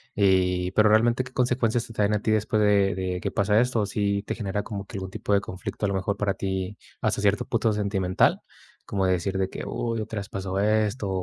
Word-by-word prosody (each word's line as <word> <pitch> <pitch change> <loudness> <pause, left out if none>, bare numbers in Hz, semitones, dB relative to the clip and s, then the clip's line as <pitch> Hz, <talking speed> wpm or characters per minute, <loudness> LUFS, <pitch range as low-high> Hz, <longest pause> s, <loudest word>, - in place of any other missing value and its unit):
y 90 -2 +2
pero 105 +1 +4
realmente, 115 +4 +3
¿qué 130 - -11
consecuencias 120 -2 +1
te 115 - -11
traen 105 0 +1
a 105 - 0
ti 110 - 0
después 110 0 +1
de 100 -1 +3
de 90 -1 -2
que - - -2
pasa 105 +2 +2
esto? 120 -4 +1
Si 100 0 -1
te - - -4
genera 105 -2 -3
como 100 -2 -6
que 100 - -8
algún 95 0 -5
tipo 100 - -2
de 100 - +5
conflicto, 95 +1 -5
a - - +2
lo 100 - -1
mejor 100 +2 -1
para 100 -1 0
ti 95 0 -3 0.2
hasta 100 - 0
cierto 100 -1 +2
punto 115 -1 +1
sentimental, 100 -3 +1 0.4
como 95 -2 -1
decir 95 +1 0
de 95 - +1
que: - - -6
''¡Uy! 115 -1 -2
Otra 110 0 -4
vez 100 - -6
pasó 95 0 -3
esto'', 105 0 +1
100 Hz, 225 wpm, -25 LUFS, 95-110 Hz, 0.4 s, de